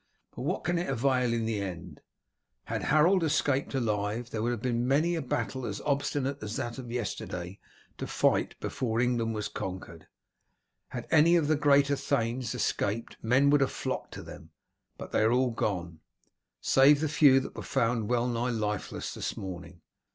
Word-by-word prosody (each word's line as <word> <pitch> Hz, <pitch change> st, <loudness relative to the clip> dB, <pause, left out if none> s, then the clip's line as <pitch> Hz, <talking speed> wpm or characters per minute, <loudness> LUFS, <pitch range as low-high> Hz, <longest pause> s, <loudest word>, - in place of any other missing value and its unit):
But -, -, -6 dB
what 160 Hz, +9 st, -2 dB
can 175 Hz, +1 st, 0 dB
it 175 Hz, -, -3 dB
avail 125 Hz, -1 st, +1 dB
in 115 Hz, -1 st, 0 dB
the 110 Hz, -2 st, -1 dB
end? 90 Hz, -4 st, -7 dB, 0.6 s
Had -, -, -3 dB
Harold 165 Hz, +5 st, +4 dB
escaped 145 Hz, -3 st, +1 dB
alive 110 Hz, -1 st, -1 dB
there 110 Hz, -, -2 dB
would 115 Hz, -, 0 dB
have 120 Hz, -, -2 dB
been 120 Hz, -1 st, 0 dB
many 155 Hz, +6 st, +2 dB
a 165 Hz, -, -1 dB
battle 130 Hz, 0 st, -3 dB
as 100 Hz, -4 st, -4 dB
obstinate 140 Hz, -1 st, -1 dB
as 105 Hz, +1 st, -5 dB
that 120 Hz, +2 st, -4 dB
of 125 Hz, -2 st, -8 dB
yesterday 100 Hz, -6 st, -4 dB, 0.4 s
to -, -, -4 dB
fight -, -, +1 dB
before 115 Hz, -3 st, -2 dB
England 120 Hz, -2 st, +1 dB
was 105 Hz, -1 st, -2 dB
conquered. 90 Hz, -4 st, -7 dB, 0.8 s
Had -, -, -6 dB
any 160 Hz, +2 st, +6 dB
of 165 Hz, -4 st, +2 dB
the 155 Hz, -, +3 dB
greater 145 Hz, -1 st, +4 dB
thanes 120 Hz, -3 st, -1 dB
escaped 115 Hz, -1 st, -2 dB
men 130 Hz, +5 st, +4 dB
would 145 Hz, -1 st, +4 dB
have 135 Hz, -, +2 dB
flocked -, -, -4 dB
to -, -, -7 dB
them, -, -, -11 dB, 0.5 s
but -, -, -8 dB
they -, -, +2 dB
are 110 Hz, +1 st, +4 dB
all 125 Hz, 0 st, +2 dB
gone, 85 Hz, -7 st, -3 dB, 0.6 s
save 140 Hz, +2 st, +5 dB
the 155 Hz, -, 0 dB
few 145 Hz, -2 st, +6 dB
that 130 Hz, -, -7 dB
were -, -, -5 dB
found 115 Hz, -4 st, 0 dB
well 120 Hz, -1 st, +2 dB
nigh 120 Hz, 0 st, -1 dB
lifeless 105 Hz, -3 st, -3 dB
this -, -, -4 dB
morning. 90 Hz, -2 st, -8 dB
125 Hz, 180 wpm, -29 LUFS, 110-140 Hz, 0.8 s, any